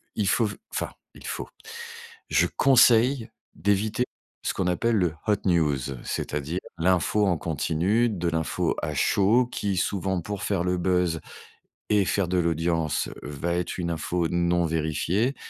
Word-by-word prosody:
il - - 0
faut - - +3
v - - -6 0.2
enfin, - - -2 0.2
il - - -13
faut - - -4 0.8
je - - +4
conseille 125 -2 +5 0.3
d'éviter 105 +4 +1 0.4
ce - - -1
qu'on 95 - -1
appelle 110 +5 +1
le 90 -4 +1
hot 105 -2 +3
news, 80 -6 +3 0.3
c'est-à-dire 75 +5 -3 0.2
l'info 95 +4 +2
en 90 -4 +2
continu, 85 - +1
de 90 -5 -2
l'info 80 -1 0
à 75 - -2
chaud 110 - +3
qui, 100 -6 -2
souvent, 95 0 0
pour 100 +2 -5
faire 95 -4 0
le 90 0 +1
buzz 90 -2 +1 0.7
et 105 -2 +3
faire 100 -1 +1
de 90 +1 +1
l'audience, 80 -2 0
va 75 +4 -3
être 90 0 -2
une 85 -2 -2
info 85 +1 -1
non 85 0 +2
vérifiée. 80 - 0
90 Hz, 150 wpm, -26 LUFS, 85-105 Hz, 0.8 s, conseille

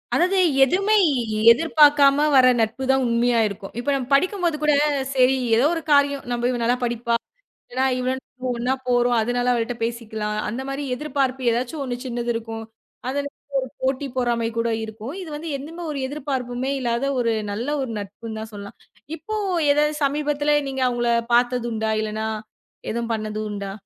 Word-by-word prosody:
அதாவது, 370 +2 +2 0.3
எதுவுமே 390 +10 +2 0.4
எ - - -1
எதிர்பாக்காம 290 0 +5
வர்ற 255 -1 +7
நட்பு 230 +4 0
தான் 265 0 +2
உண்மையா 235 0 +2
இருக்கும். 200 -1 -8
இப்போ 285 - -2
நம்ம 255 -2 -3
படிக்கும் 365 +6 +2
போது 330 -3 +1
கூட, 300 -1 +3 0.4
சரி 255 0 +5 0.2
ஏதோ 245 +5 +3
ஒரு 330 - -2
காரியம், 285 -1 +3
நம்ப 240 0 -2
இவ 240 - -2
நல்ல 240 +2 +3
படிப்பா. 235 0 0 0.5
இல்லன்னா 260 +2 0
இவ 255 +1 0 0.4
ஒண்ணா 250 +3 0
போறோம். 245 0 +3
அதனால 245 +2 0
அவள்ட்ட 235 0 -1
பேசிக்கலாம். 220 -2 -3
அந்த 245 +5 -4
மாரி 275 +1 -3
எதிர்பார்ப்பு 265 -3 -1
ஏதாச்சும் 255 +5 -2
ஒண்ணு 245 -2 -3
சின்னது 240 -1 -2
இருக்கும். 225 0 -5 0.4
அதிலருந்து 285 0 -4
ஒரு 260 - -5
போட்டி 265 +1 0
பொறாமை 235 -2 0
கூட 230 0 +1 0.2
இருக்கும். 220 +7 -7
இது 350 - -8
வந்து 325 +2 -6
எந்துமே 330 +5 -8
ஒரு 280 - -4
எதிர்பார்ப்புமே 265 -3 -3
இல்லாத 235 +1 -1
ஒரு 230 -2 +1 0.2
நல்ல 230 +4 -3 0.2
ஒரு 255 - -4
நட்புன்னு 220 +2 -8
தான் 220 0 -8
சொல்லலாம். 200 0 -9 0.4
இப்போ 430 +7 -5 0.3
ஏதாவது 300 +1 +3
சமீபத்தில 295 +1 +1
நீங்க 265 -1 -3
அவுங்கள 240 -1 0 0.2
பாத்தது 245 0 +2
உண்டா? 220 0 -1
இல்லன்னா 215 +1 -3 0.6
எதுவும் 235 0 -2
பண்ணது 215 0 -4
உண்டா? 200 -1 -5
250 Hz, 165 wpm, -23 LUFS, 230-280 Hz, 0.6 s, வர்ற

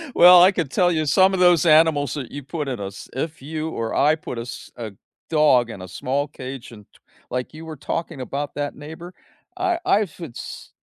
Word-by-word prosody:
Well, 180 0 +9
I 190 - +7
could 165 -7 -2
tell 175 -1 +3
you 155 -2 0
some 190 +6 +4
of 185 - -1
those 175 -2 +5
animals 155 -3 +4
that 135 -4 -6
you 145 -1 -7
put 150 0 -4
in 125 -5 -3
a 100 - -4
s 100 - -10
if 150 +3 -4
you 155 +2 -4
or 115 -6 -3
I 150 +2 +4
put 125 -6 -7
a - - -3
s 120 - -9
a 110 -3 -6 0.4
dog 140 -7 +4
in 100 -4 -8
a 95 - -8
small 140 +9 -2
cage 130 -3 -9
and 105 -3 -13
to - - -23 0.3
like, 125 +4 -4
you 160 +1 -10
were 160 -1 -7
talking 165 -2 -4
about 140 +2 -4
that 145 0 -3
neighbor, 160 +5 -10 0.4
I 360 -2 0
I 210 - +4
futz 165 -7 -9
150 Hz, 220 wpm, -22 LUFS, 130-165 Hz, 0.4 s, Well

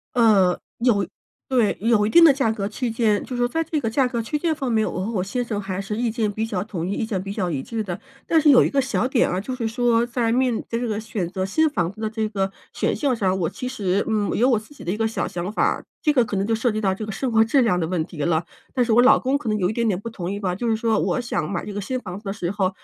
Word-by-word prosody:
呃， 200 -7 +4 0.2
有 220 -6 +2 0.4
对， 245 -6 +2
有 215 -1 +3
一 - - -1
定 340 - +7
的 325 - +9
价 270 -5 +1
格 200 -2 -3
区 235 +2 -3
间， 220 -2 +1
就 255 - -6
是 245 0 +1
在 325 +6 -1
这 315 -1 -2
个 230 - -1
价 255 +3 +2
格 245 -2 -2
区 295 +7 -2
间 325 +1 0
方 270 -4 -3
面， 220 -2 +2
我 180 - -4
和 230 - -3
我 185 -4 -1
先 245 +6 -2
生 225 -4 -3
还 195 -1 -4
是 200 +2 -4
意 235 0 0
见 220 -2 -1
比 215 +2 -2
较 200 -5 -2
统 185 -6 -4
一， 190 - -2
意 220 - -2
见 195 -4 -2
比 195 +1 -5
较 190 -4 -2
一 135 -4 -2
致 225 -1 -3
的， 180 -4 -5 0.3
但 330 - +3
是 305 -1 +5
有 260 - +7
一 - - +2
个 275 -1 +1
小 260 -1 0
点 260 -2 +3
啊， 180 +2 -1
就 255 +5 -4
是 230 - -2
说 235 0 +2
在 235 -1 -1
面 245 -1 +1
在 230 - -2
这 245 - -2
个 215 -2 -2
选 215 -4 -3
择 185 +2 -3
新 315 +11 +2
房 175 - -1
子 215 +2 -11
的 215 - -1
这 220 -1 -2
个 195 -2 -2 0.2
选项 275 -4 0
上， 190 -4 +1
我 165 - +1
其 250 - -6
实， 200 -7 0
嗯， 215 -2 0
有 250 +4 +3
我 235 - +3
自 215 +7 -13
己 - - -12
的 175 - -1
一 - - -2
个 225 0 +1
小 225 - -2
想 175 +2 -4
法 215 - -1
儿， - - +1 0.2
这 300 - +3
个 255 - +4
可 210 -3 -3
能 195 +1 0
就 225 - +1
涉 225 +2 +1
及 215 0 -2
到 195 -2 +2
这 210 +2 -6
个 - - -5
生 250 +4 -2
活 220 0 +5
质 245 +4 +3
量 180 -6 +2
的 165 - 0
问 165 -2 -1
题 165 - -12
了， 165 0 +1 0.3
但 250 -2 +3
是 230 - 0
我 230 - +6
老 255 +2 +6
公 265 +2 0
可 245 - -5
能 215 - +1
有 185 -2 +1
一 - - -2
点 235 0 0
点 190 -4 0
不 230 +4 -6
同 180 -5 -5
意 200 - -3
吧， 185 -3 -1
就 235 +5 -2
是 225 - +2
说 220 -1 +1
我 - - 0
想 235 -9 -2
买 190 - -3
这 210 - -6
个 205 - -3
新 255 +6 -3
房 185 -4 -7
子 215 - -17
的 - - -1
时 180 -5 -3
候， 195 -2 0
220 Hz, 345 characters per minute, -23 LUFS, 195-245 Hz, 0.4 s, 的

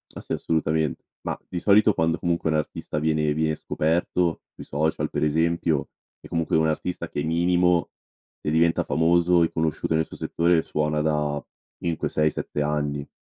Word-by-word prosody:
Ah, - - -7
sì, - - -13
assolutamen 80 -2 0 0.3
mah, - - -3
di 90 - -3
solito 105 +3 +5
quando, 80 -1 +1
comunque, 85 -2 -1
un 80 - +1
artista 75 0 -3
viene 75 -1 +1
viene 80 0 0
scoperto, 85 +2 0
sui - - -10
social 80 +3 -1
per - - -2
esempio, 80 0 +1 0.3
è - - -13
comunque 80 -1 -1
un 80 0 +3
artista 85 +3 -3
che, 75 - -3
minimo, 85 +1 +2 0.5
se - - -2
diventa 80 +1 +3
famoso 85 +2 +3
e 85 - 0
conosciuto 80 0 -1
nel 80 0 +2
suo - - -11
settore, 85 0 +1
suona 75 -1 -1
da 75 -1 0 0.3
5-6-7 75 -2 -1
anni. 75 -1 -1
80 Hz, 160 wpm, -24 LUFS, 75-85 Hz, 0.5 s, solito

